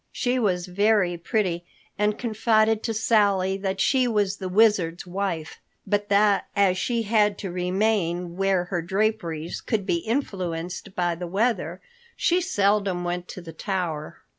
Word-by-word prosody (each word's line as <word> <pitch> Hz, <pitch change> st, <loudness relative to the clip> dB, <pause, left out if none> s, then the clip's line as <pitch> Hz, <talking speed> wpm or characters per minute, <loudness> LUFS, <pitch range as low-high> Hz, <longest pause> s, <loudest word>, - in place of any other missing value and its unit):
She 250 Hz, +1 st, 0 dB
was 180 Hz, -6 st, 0 dB
very 200 Hz, -1 st, +2 dB
pretty, 175 Hz, -1 st, -1 dB, 0.3 s
and 210 Hz, +1 st, 0 dB
confided 220 Hz, -1 st, +2 dB
to 225 Hz, -, -2 dB
Sally 200 Hz, -4 st, +2 dB
that 195 Hz, -1 st, -3 dB
she 255 Hz, -2 st, +3 dB
was 205 Hz, -4 st, 0 dB
the 190 Hz, -2 st, -5 dB
Wizard's 190 Hz, -5 st, +3 dB
wife, 180 Hz, -3 st, -4 dB, 0.3 s
but 205 Hz, 0 st, -1 dB
that 205 Hz, 0 st, +3 dB
as 190 Hz, -2 st, +3 dB
she 235 Hz, +1 st, 0 dB
had 210 Hz, -2 st, +2 dB
to 195 Hz, -, -5 dB
remain 180 Hz, -1 st, 0 dB
where 195 Hz, -1 st, +1 dB
her 180 Hz, -1 st, -3 dB
draperies 175 Hz, -3 st, -2 dB
could 215 Hz, -5 st, -1 dB
be 170 Hz, -, +1 dB
influenced 185 Hz, -, -3 dB
by 175 Hz, -1 st, +1 dB
the 175 Hz, +1 st, -6 dB
weather, 220 Hz, +7 st, -1 dB, 0.3 s
she 355 Hz, +1 st, +2 dB
seldom 200 Hz, -, +1 dB
went 175 Hz, 0 st, -3 dB
to 185 Hz, -, -8 dB
the 165 Hz, -2 st, -10 dB
tower. 170 Hz, -4 st, -3 dB
195 Hz, 150 wpm, -25 LUFS, 175-215 Hz, 0.3 s, she